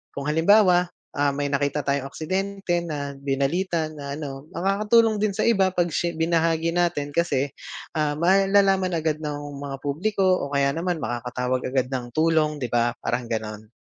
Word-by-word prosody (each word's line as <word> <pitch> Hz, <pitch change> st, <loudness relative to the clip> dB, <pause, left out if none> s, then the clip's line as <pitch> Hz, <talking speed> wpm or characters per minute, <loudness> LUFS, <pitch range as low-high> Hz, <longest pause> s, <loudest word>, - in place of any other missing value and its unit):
Kung 140 Hz, -, -4 dB
halimbawa, 180 Hz, +4 st, +4 dB, 0.2 s
ah, 145 Hz, -1 st, 0 dB
may 145 Hz, 0 st, -2 dB
nakita 145 Hz, +1 st, 0 dB
tayong 140 Hz, 0 st, -1 dB
aksidente 190 Hz, +4 st, -2 dB
na 150 Hz, -4 st, -4 dB
binalita 145 Hz, +5 st, -1 dB
na 140 Hz, -2 st, -6 dB
ano 140 Hz, -1 st, -7 dB
makakatulong 210 Hz, +4 st, +3 dB
din 205 Hz, -2 st, 0 dB
sa -, -, 0 dB
iba 195 Hz, -5 st, +4 dB
'pag 175 Hz, -2 st, 0 dB
shi 170 Hz, +2 st, -1 dB
binahagi 165 Hz, 0 st, +1 dB
natin 170 Hz, -4 st, 0 dB
kasi, 145 Hz, -4 st, 0 dB, 0.4 s
ah, 150 Hz, -2 st, 0 dB
malalaman 195 Hz, +1 st, +3 dB
agad 160 Hz, -1 st, -1 dB
ng 150 Hz, -2 st, -4 dB, 0.2 s
mga 140 Hz, -1 st, -5 dB
publiko 185 Hz, +8 st, -1 dB
o 185 Hz, -6 st, +2 dB
kaya 140 Hz, 0 st, +3 dB
naman 165 Hz, +1 st, -2 dB
makakatawag 125 Hz, +2 st, -2 dB
agad 130 Hz, 0 st, -1 dB
ng 125 Hz, -2 st, -3 dB
tulong, 155 Hz, -1 st, +2 dB
'di 130 Hz, -5 st, -5 dB
ba, 120 Hz, 0 st, +1 dB
parang 120 Hz, 0 st, -1 dB
gano'n. 110 Hz, -2 st, -4 dB
155 Hz, 160 wpm, -24 LUFS, 140-180 Hz, 0.4 s, halimbawa